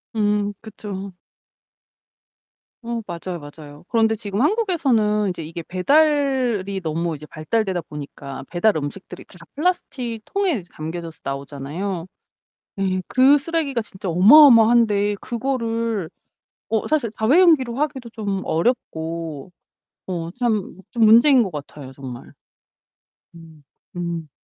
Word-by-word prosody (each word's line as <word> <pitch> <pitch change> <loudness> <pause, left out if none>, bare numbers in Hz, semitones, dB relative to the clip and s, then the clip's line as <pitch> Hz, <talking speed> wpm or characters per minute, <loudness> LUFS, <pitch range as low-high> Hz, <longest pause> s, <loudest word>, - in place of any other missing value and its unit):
음 205 -1 +1
그쵸. 200 -3 -7 1.7
어 235 -1 -4
맞아요, 175 +1 -5
맞아요. 145 +1 -12
그런데 225 -1 +2
지금 205 -1 -3
한국에서는 270 - +2
이제 180 - -5
이게 165 +2 -7
배달이 255 - +1
너무 165 0 -2
이제 150 +1 -10
발달되다 185 +4 -2
보니까 145 -3 -8
배달 190 +5 +2
음식들이 155 +5 -6
다 - - -17 0.2
플라스틱 270 -8 -2
통에 395 -2 0
이제 175 - -15
담겨져서 165 +1 -6
나오잖아요. 145 +7 -5 0.7
예. 185 -1 0
그 265 +3 +5
쓰레기가 290 -5 -1
진짜 190 -3 -8
어마어마한데 220 - +6
그거를 230 -6 -2 0.6
어 220 -2 0
사실 285 -8 0
다회용기로 265 0 +4
하기도 270 -4 -3
좀 200 -4 -3
어렵고 165 - -2 0.6
어 170 -3 -4
참 215 -3 -2
좀 235 -3 +2
문제인 235 +4 +7
것 200 - -3
같아요, 145 -2 -8
정말. 130 -3 -9 1.0
음. 165 -3 -15 0.3
음. 170 -3 -4
205 Hz, 265 characters per minute, -22 LUFS, 165-240 Hz, 1.7 s, 문제인